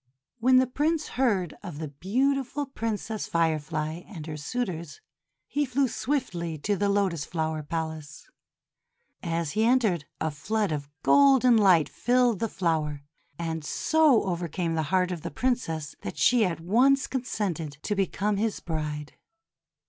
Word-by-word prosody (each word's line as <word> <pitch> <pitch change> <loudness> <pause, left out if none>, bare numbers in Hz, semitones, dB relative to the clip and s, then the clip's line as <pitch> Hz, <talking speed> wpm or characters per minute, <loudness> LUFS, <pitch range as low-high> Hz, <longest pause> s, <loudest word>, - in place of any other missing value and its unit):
When 255 +3 +4
the 260 0 +6
Prince 300 +5 -1
heard 210 -9 +1
of 175 -7 -7
the 155 -1 -5
beautiful 265 - 0
Prin 230 -5 -3
cess 220 +1 -5
Firefly 155 0 -1
and 175 -7 -8
her 155 -1 -5
suitors, 170 -1 -4 0.5
he 290 - -1
flew 265 0 +1
swiftly 175 - -2
to 205 +8 -1
the 200 +1 0
Lotus 195 -6 +1
Flower 160 -2 -2
Palace. 160 -1 -5 0.9
As 165 -3 -2
he 215 +2 +1
entered, 225 - +2
a 160 - -1
flood 200 +7 -1
of 145 -2 -3
golden 265 -3 +6
light 185 -8 +5
filled 245 -4 +2
the 225 - -1
flower, 155 -6 -1 0.3
and 165 -2 -3
so 305 - +3
overcame 175 -2 -2
the 160 - 0
heart 185 0 +2
of 175 -3 -4
the 170 - -4
Princess 175 - -2
that - - -6
she 240 -3 +4
at 170 -3 -2
once 250 +11 +3
con 260 - -2
sented 170 - -3
to 210 - -1
become 200 +1 0
his 215 +1 -1
bride. 150 -3 -4
185 Hz, 150 wpm, -27 LUFS, 160-240 Hz, 0.9 s, the